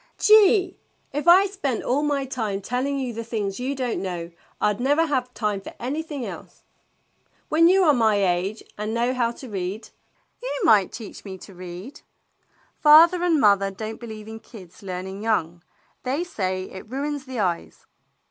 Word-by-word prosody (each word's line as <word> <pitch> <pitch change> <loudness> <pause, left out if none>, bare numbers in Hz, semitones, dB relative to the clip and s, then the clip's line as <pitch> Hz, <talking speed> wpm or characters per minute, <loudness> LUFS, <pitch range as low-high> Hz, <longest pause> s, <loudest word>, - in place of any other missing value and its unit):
"Gee! 405 -3 +5 0.3
If 295 +3 -3
I 370 +3 +8
spent 330 - -3
all 265 +4 +1
my 290 -2 0
time 220 -7 -3
telling 255 +7 -2
you 255 -3 -3
the 230 +1 -5
things 210 -3 -3
you 265 +3 -2
don't 255 -3 -2
know, 175 -3 -5 0.3
I 210 - +2
'd 200 - -11
never 290 +5 +3
have 260 -5 -1
time 210 -3 -1
for - - -10
anything 285 +1 -4
else. - - -10 0.9
When 330 +2 +5
you 375 +2 +5
are 305 -4 +5
my 225 -4 +3
age 195 +2 0 0.2
and 215 +2 -2
know 240 +2 +1
how 240 -2 +1
to 260 - -11
read 195 0 -5 0.2
— - - -42
" - - -45
"You - - -3
might 210 - +5
teach 225 -3 -9
me 190 -2 -8
to 195 +2 -13
read." 185 - -9 0.4
" - - -38
Father 330 +4 +7
and 335 -4 +3
mother 200 -4 +4
don't 220 +3 -7
believe 220 -2 -9
in 220 0 -8
kids 190 -4 -14
learn 185 -2 -5
ing 190 +1 -7
young. 175 -6 -1 0.4
They 270 +6 -1
say 185 - -3
it 190 +2 -10
ruins 285 +2 -3
the 260 -3 -5
eyes." 180 -4 -2
235 Hz, 185 wpm, -24 LUFS, 200-290 Hz, 0.9 s, I